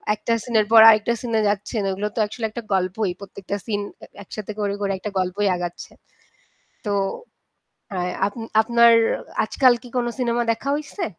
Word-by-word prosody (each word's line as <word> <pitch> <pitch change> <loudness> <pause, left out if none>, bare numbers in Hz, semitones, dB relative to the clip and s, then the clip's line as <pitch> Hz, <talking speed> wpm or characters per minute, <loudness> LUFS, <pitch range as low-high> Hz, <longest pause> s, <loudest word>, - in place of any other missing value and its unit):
একটা 230 +2 -2
সিনের 220 -3 +1
পর 225 -1 +9
আরেকটা 215 +2 +3
সিনে 230 -3 -1
যাচ্ছেন, 205 +1 -2
ওগুলো 200 +2 -2
তো - - -2
আসলে 220 +1 -5
একটা 230 +2 -7
গল্পই। 185 +1 0
প্রত্যেকটা 200 0 -7
সিন 205 -3 -2 0.2
এ - - -8 0.2
একসাথে 215 +2 -7
করে 200 -1 -1
করে 200 -1 0
একটা 205 +2 -6
গল্পই 190 +3 -1
আগাচ্ছে। 175 -1 -6 0.9
তো 205 - -1 1.0
আ - - -2 0.3
আপ 200 - -4 0.3
আপনার 235 +1 +5 0.3
আ - - -10 0.2
আজকাল 255 +2 +4
কি 245 - -11
কোন 240 -1 +1
সিনেমা 240 -1 0
দেখা 275 +5 -6
হইছে? 305 +6 -5
215 Hz, 165 wpm, -22 LUFS, 200-235 Hz, 1.0 s, পর